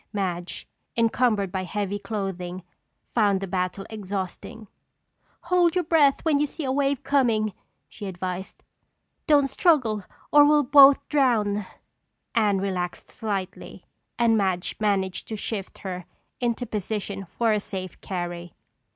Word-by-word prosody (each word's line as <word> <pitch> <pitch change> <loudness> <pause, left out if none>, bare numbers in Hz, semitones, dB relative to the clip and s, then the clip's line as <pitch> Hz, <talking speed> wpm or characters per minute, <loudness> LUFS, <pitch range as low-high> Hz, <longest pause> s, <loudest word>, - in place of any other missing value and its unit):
Madge, 180 -3 -3 0.3
encumbered 225 -4 +2
by 190 -1 -2
heavy 205 +1 -3
clothing, 185 -4 -4 0.5
found 205 -4 +3
the 195 - -3
battle 185 +1 -2
exhausting. 205 +1 -5 0.7
"Hold 350 -1 +2
your 360 - +2
breath 305 -4 +3
when 305 -3 +3
you 295 - +2
see 315 - -7
a 260 - -1
wave 280 0 0
coming," 230 -7 +2 0.3
she 205 - -8
advised. 185 0 -5 0.6
"Don't 290 -3 +5
struggle 255 - +2 0.3
or 295 0 +8
we'll 295 0 +5
both 275 +1 +7
drown." 215 -8 +1 0.7
Anne 210 -4 +3
relaxed 185 -2 -3
slightly 195 -3 -5 0.3
and 235 -1 +4
Madge 190 -4 0
managed 195 -3 0
to 220 - -4
shift 205 -2 -5
her 180 -2 -4 0.3
into 240 0 -1
position 205 -2 -4
for 230 -2 +3
a 210 - +2
safe 185 -3 -7
carry. 175 -2 -5
210 Hz, 130 wpm, -25 LUFS, 190-255 Hz, 0.7 s, or